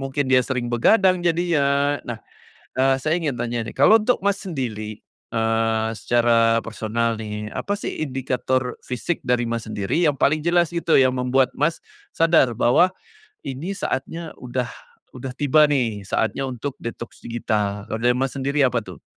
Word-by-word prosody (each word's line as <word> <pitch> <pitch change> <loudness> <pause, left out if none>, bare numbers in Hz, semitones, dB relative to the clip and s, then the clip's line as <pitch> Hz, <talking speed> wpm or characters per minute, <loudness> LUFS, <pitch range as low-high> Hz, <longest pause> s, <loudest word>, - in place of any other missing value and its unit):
mungkin 135 0 -2
dia 130 - +7
sering 125 -2 -2
begadang 185 - +4
jadinya 145 -5 +1
nah, 120 - -3 0.6
eee, 135 +1 +3
saya 155 +6 0
ingin 145 -5 -1
tanya 120 0 -2
nih - - -12
kalau 220 +1 +6
untuk 215 -2 0
Mas 200 0 +1
sendiri, 110 - -5 0.3
eee, 115 0 +1
secara 115 -1 +3
personal 115 +1 -2
nih 105 -1 -5
apa 205 - -2
sih 205 - -4 0.2
indikator 130 -1 -2
fisik 130 +7 -2
dari 120 0 +2
Mas 115 -1 -3
sendiri 110 - 0
yang 145 - +1
paling 145 +3 +2
jelas 170 +1 +2
gitu 170 -1 +1
yang 130 -1 +5
membuat 130 +1 +1
Mas, 160 +3 0 0.3
sadar 160 -7 +4
bahwa 150 +12 +4 0.6
ini 140 +8 -4
saatnya 165 -2 -4
udah 125 -1 -3 0.4
udah 130 0 -7
tiba 150 +2 +4
nih 115 -9 -1
saatnya 135 +7 -1
untuk 130 +2 -4
detox 115 0 -7
digital 105 -3 -2
kalau 110 - -2
dari 120 +1 +2
Mas 135 +1 -1
sendiri 140 +1 0
apa 125 -2 +2
tuh? 95 -5 -11
130 Hz, 160 wpm, -22 LUFS, 115-150 Hz, 0.6 s, dia